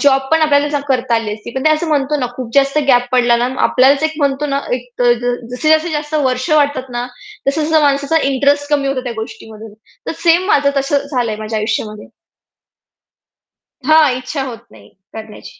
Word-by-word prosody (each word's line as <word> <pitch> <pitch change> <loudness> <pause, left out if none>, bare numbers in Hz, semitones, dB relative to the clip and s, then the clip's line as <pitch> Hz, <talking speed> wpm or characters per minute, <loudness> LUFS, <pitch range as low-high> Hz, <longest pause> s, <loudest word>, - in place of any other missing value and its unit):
Job 270 -2 +3
पण 320 0 +3
आपल्याला 290 -1 +2
करता 250 -2 +1
आली 225 -2 -1
असती. 215 +2 -10
पण 265 - -3
ते - - +5
असं 315 +2 0
म्हणतो 295 0 0
ना, 255 -4 -1
खूप 250 -3 -6
जास्त 275 +1 +3
गॅप 245 -1 +4
पडला 240 -1 +3
ना 240 +1 0 0.2
आपल्यालाच 275 +3 +3
एक 315 0 +1
म्हणतो 285 0 0
ना, 280 0 -1
एक 250 0 -3
ज 240 0 +5
जसं-जसं 245 +3 -3
जास्ती 315 +2 +2
जास्त 300 +1 -4
वर्ष 255 +4 -1
वाटतात 285 -4 +1
ना, 240 +1 -3 0.4
तसं-तसं 310 +2 +1
माणसाचा 285 +2 +2
इंटरेस्ट 285 +2 +1
कमी 280 -2 +1
होतो 275 -1 -1
त्या 245 - -4
गोष्टीमधून. 220 -1 -9 0.3
तर - - -2
सेम 340 +2 +4
माझं 285 -8 +3
तसं 275 +1 0
झालंय 235 -5 -1
माझ्या 215 0 -4
आयुष्यामध्ये. 215 -1 -3 1.8
हां, 310 -2 +5
इच्छा 270 +3 -5
होत 250 -3 -6
नाही 105 -2 -17 0.2
करण्याची. 220 - -11
270 Hz, 180 wpm, -16 LUFS, 240-295 Hz, 1.8 s, ते